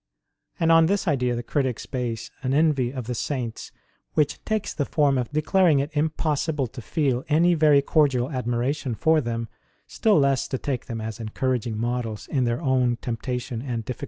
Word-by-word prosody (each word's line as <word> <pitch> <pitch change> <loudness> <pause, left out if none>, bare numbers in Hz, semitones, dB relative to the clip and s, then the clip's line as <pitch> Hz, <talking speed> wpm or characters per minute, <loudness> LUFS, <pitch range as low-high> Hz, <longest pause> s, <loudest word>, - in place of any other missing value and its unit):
And 165 0 +3
on 165 0 +6
this 200 +1 0
idea 125 -5 +1
the 120 - -4
critics 130 -2 -1
base 120 -2 -4
an 130 +1 0
envy 145 -5 +2
of 130 -3 -5
the 125 - -3
Saints 120 -2 -4 0.4
which 150 -2 +1
takes 215 -2 -1
the 145 - -1
form 145 -3 +2
of 125 -2 -1
declaring 155 +1 +3
it 140 +3 -1
impossible 155 -1 0
to 125 +2 -9
feel 130 +1 0
any 170 +4 +4
very 150 -3 +4
cordial 140 -4 +2
admiration 125 +1 -1
for 160 +8 +3
them, 115 -2 -3 0.4
still 215 -3 +2
less 140 -2 +2
to 130 - -2
take 130 -2 -3
them 115 -2 -4
as 110 +1 -5
encouraging 115 0 -2
models 115 -2 -3
in 130 -3 0
their 120 +7 -1
own 130 -3 +2
temptation 120 0 -4
and 120 -4 -4
difficulties. 125 0 -5
130 Hz, 180 wpm, -24 LUFS, 120-150 Hz, 0.4 s, on